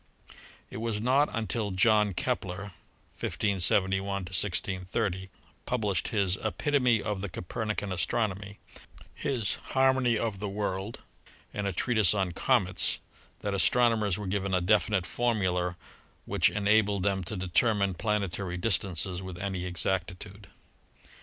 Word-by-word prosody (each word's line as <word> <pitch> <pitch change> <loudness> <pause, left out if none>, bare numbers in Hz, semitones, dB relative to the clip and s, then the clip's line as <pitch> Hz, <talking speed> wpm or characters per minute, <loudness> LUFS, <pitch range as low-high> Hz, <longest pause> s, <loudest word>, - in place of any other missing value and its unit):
It - - -6
was 110 -1 -1
not 130 +6 +3
until 110 -1 -1
John 105 0 +3
Kepler 95 +4 -2 0.5
(1571 95 -1 +1
1630) 95 0 -1 0.4
published 105 -8 0
his 100 -4 +1
"Epitome 125 0 +2
of 105 -2 -2
the 100 - -4
Copernican 105 +3 -3
Astronomy," 100 +1 -1 0.6
his 120 -7 0 0.2
"Harmony 130 -3 +4
of 105 -3 -2
the 105 0 -3
World" 100 +1 -3 0.5
and 105 -1 -2
a - - 0
treatise 110 0 +3
on 95 -3 0
"Comets" 95 -1 +1 0.4
that 100 - -2
astrono 120 +4 +4
mers 100 -4 0
were 105 - -5
given 95 0 -1
a - - +3
definite 105 0 +2
formula 90 -8 0 0.5
which - - +3
enabled 105 -1 +2
them 95 -1 +1
to 105 - -3
determine 100 +2 +2
planetary 95 -2 -2
distances 90 -2 -1
with 95 -2 -7
any 95 -1 -3
exactitude. 95 +2 -3
100 Hz, 120 wpm, -29 LUFS, 95-110 Hz, 0.6 s, Harmony